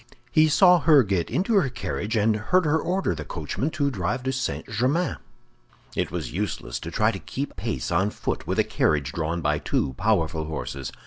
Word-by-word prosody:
He 155 Hz, 0 st, +5 dB
saw 180 Hz, +3 st, +6 dB
her 150 Hz, -3 st, +6 dB
get 95 Hz, -5 st, -1 dB
into 195 Hz, +6 st, 0 dB
her 150 Hz, -9 st, +3 dB
carriage, 115 Hz, -3 st, -3 dB
and 110 Hz, 0 st, +3 dB
heard 170 Hz, -, +2 dB
her 155 Hz, +1 st, +2 dB
order 185 Hz, -, 0 dB
the 75 Hz, -2 st, -6 dB
coachman 80 Hz, -, -3 dB
to 140 Hz, -2 st, +1 dB
drive 100 Hz, +3 st, -2 dB
to 130 Hz, -, 0 dB
St. 130 Hz, 0 st, -3 dB
Germain. 130 Hz, -, 0 dB, 0.8 s
It -, -, 0 dB
was -, -, -5 dB
useless 90 Hz, -10 st, -3 dB
to -, -, -6 dB
try -, -, +2 dB
to -, -, -6 dB
keep -, -, -5 dB
pace 65 Hz, -, -3 dB
on 95 Hz, +4 st, +2 dB
foot -, -, -4 dB
with -, -, -1 dB
a -, -, +4 dB
carriage 70 Hz, -2 st, 0 dB
drawn 80 Hz, +1 st, -2 dB
by 75 Hz, -1 st, +1 dB
two 70 Hz, -2 st, -1 dB
powerful 80 Hz, -1 st, +1 dB
horses. 70 Hz, -4 st, -5 dB
105 Hz, 195 wpm, -25 LUFS, -, 0.8 s, saw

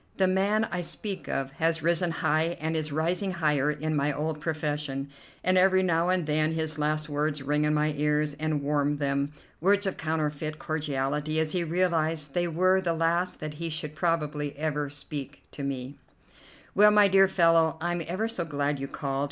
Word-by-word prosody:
The 190 Hz, -, +4 dB
man 200 Hz, +4 st, +2 dB
I 175 Hz, +1 st, -1 dB
speak 195 Hz, +3 st, -5 dB
of 135 Hz, 0 st, -2 dB
has 165 Hz, -1 st, +1 dB
risen 170 Hz, +1 st, +3 dB
high 165 Hz, +1 st, 0 dB
and 160 Hz, +1 st, -2 dB
is 155 Hz, -1 st, -1 dB
rising 175 Hz, +6 st, 0 dB
higher 150 Hz, -4 st, +1 dB
in 155 Hz, +1 st, -2 dB
my 145 Hz, 0 st, +1 dB
old 150 Hz, +2 st, -3 dB
profession, 150 Hz, -3 st, -3 dB, 0.3 s
and 185 Hz, +1 st, +4 dB
every 190 Hz, 0 st, +4 dB
now 170 Hz, -1 st, +2 dB
and 185 Hz, -3 st, +1 dB
then 155 Hz, +1 st, +1 dB
his 160 Hz, -1 st, -2 dB
last 150 Hz, 0 st, 0 dB
words 145 Hz, -1 st, -1 dB
ring 150 Hz, +2 st, +1 dB
in 150 Hz, -, +2 dB
my 150 Hz, 0 st, +1 dB
ears 150 Hz, 0 st, +1 dB
and 155 Hz, -2 st, -1 dB
warm 145 Hz, 0 st, +1 dB
them, 140 Hz, 0 st, -1 dB, 0.3 s
words 200 Hz, +4 st, +3 dB
of 190 Hz, -, -2 dB
counterfeit 155 Hz, -1 st, -2 dB
cordiality 150 Hz, 0 st, -1 dB
as 160 Hz, -1 st, 0 dB
he 180 Hz, -2 st, 0 dB
realized 165 Hz, -4 st, 0 dB
they 175 Hz, 0 st, +1 dB
were 185 Hz, +3 st, +3 dB
the 170 Hz, -3 st, 0 dB
last 170 Hz, +2 st, 0 dB
that 155 Hz, -1 st, -4 dB
he 165 Hz, +2 st, -4 dB
should 155 Hz, -1 st, -4 dB
probably 150 Hz, -3 st, -1 dB
ever 150 Hz, -1 st, -1 dB
speak 145 Hz, 0 st, -7 dB
to -, -, -7 dB
me: 135 Hz, 0 st, -4 dB, 0.7 s
"Well, 210 Hz, +2 st, +7 dB
my 210 Hz, -1 st, +6 dB
dear 195 Hz, 0 st, +5 dB
fellow, 165 Hz, -3 st, +3 dB
I'm 175 Hz, +1 st, -1 dB
ever 190 Hz, +6 st, -1 dB
so 225 Hz, -6 st, -3 dB
glad 145 Hz, -2 st, -1 dB
you 135 Hz, -, -4 dB
called. 135 Hz, -1 st, -3 dB
155 Hz, 185 wpm, -27 LUFS, 150-170 Hz, 0.7 s, Well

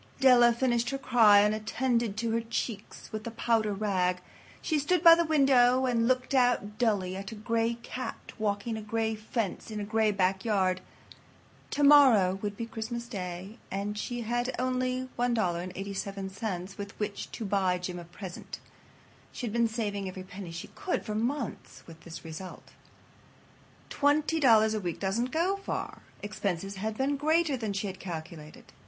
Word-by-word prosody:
Della 245 Hz, -3 st, +7 dB
finished 240 Hz, 0 st, +1 dB
her 275 Hz, -, -2 dB
cry 220 Hz, -6 st, +6 dB
and 210 Hz, +1 st, +3 dB
attended 225 Hz, 0 st, -1 dB
to 230 Hz, 0 st, -1 dB
her 230 Hz, +1 st, +1 dB
cheeks 225 Hz, -2 st, -5 dB
with 215 Hz, -1 st, -5 dB
the 230 Hz, -, -4 dB
powder 225 Hz, -2 st, +1 dB
rag. 190 Hz, -3 st, 0 dB, 0.4 s
She 310 Hz, -3 st, 0 dB
stood 330 Hz, +4 st, +1 dB
by 335 Hz, -1 st, +11 dB
the 340 Hz, 0 st, +3 dB
window 260 Hz, -4 st, +4 dB
and 230 Hz, -2 st, +2 dB
looked 255 Hz, +1 st, +1 dB
out 245 Hz, -5 st, +2 dB
dully 200 Hz, -6 st, +1 dB
at 195 Hz, +1 st, -6 dB
a -, -, -7 dB
gray 230 Hz, +2 st, 0 dB
cat 255 Hz, -, -6 dB
walking 215 Hz, +1 st, -1 dB
a -, -, -5 dB
gray 220 Hz, +1 st, -1 dB
fence 215 Hz, -1 st, -3 dB
in 215 Hz, -1 st, -4 dB
a -, -, -3 dB
gray 220 Hz, +1 st, +2 dB
backyard. 190 Hz, -1 st, +1 dB, 0.9 s
Tomorrow 265 Hz, -11 st, +6 dB
would 205 Hz, -1 st, -4 dB
be 230 Hz, -, -3 dB
Christmas 235 Hz, +1 st, -5 dB
Day, 190 Hz, 0 st, -6 dB
and 200 Hz, +2 st, -3 dB
she 240 Hz, +3 st, -4 dB
had 240 Hz, +2 st, -1 dB
only 255 Hz, 0 st, -1 dB
$1.87 195 Hz, -2 st, -2 dB
with 200 Hz, 0 st, -7 dB
which 210 Hz, -1 st, -4 dB
to 225 Hz, -, -5 dB
buy 190 Hz, -2 st, +1 dB
Jim 180 Hz, 0 st, -5 dB
a -, -, -8 dB
present. 175 Hz, +1 st, -9 dB, 0.7 s
She -, -, -5 dB
had 215 Hz, -, -4 dB
been 235 Hz, 0 st, +3 dB
saving 205 Hz, -3 st, -3 dB
every 185 Hz, 0 st, -7 dB
penny 185 Hz, -1 st, -9 dB
she 165 Hz, +1 st, -7 dB
could 370 Hz, -, -3 dB
for 215 Hz, -, -3 dB
months, 240 Hz, +3 st, -3 dB
with 165 Hz, -1 st, -13 dB
this 170 Hz, 0 st, -10 dB
result. 165 Hz, +4 st, -9 dB, 1.2 s
Twenty 295 Hz, +3 st, +2 dB
dollars 220 Hz, -6 st, +5 dB
a 215 Hz, -, -1 dB
week 175 Hz, -4 st, -4 dB
doesn't 210 Hz, +6 st, 0 dB
go 350 Hz, +7 st, +1 dB
far. 395 Hz, -, -5 dB, 0.2 s
Expenses 195 Hz, -2 st, -3 dB
had 215 Hz, +2 st, -3 dB
been 280 Hz, +2 st, 0 dB
greater 310 Hz, +1 st, +2 dB
than 220 Hz, -5 st, -3 dB
she 200 Hz, +1 st, -2 dB
had 190 Hz, -1 st, -5 dB
calculated. 160 Hz, -3 st, -8 dB
220 Hz, 165 wpm, -29 LUFS, 195-245 Hz, 1.2 s, by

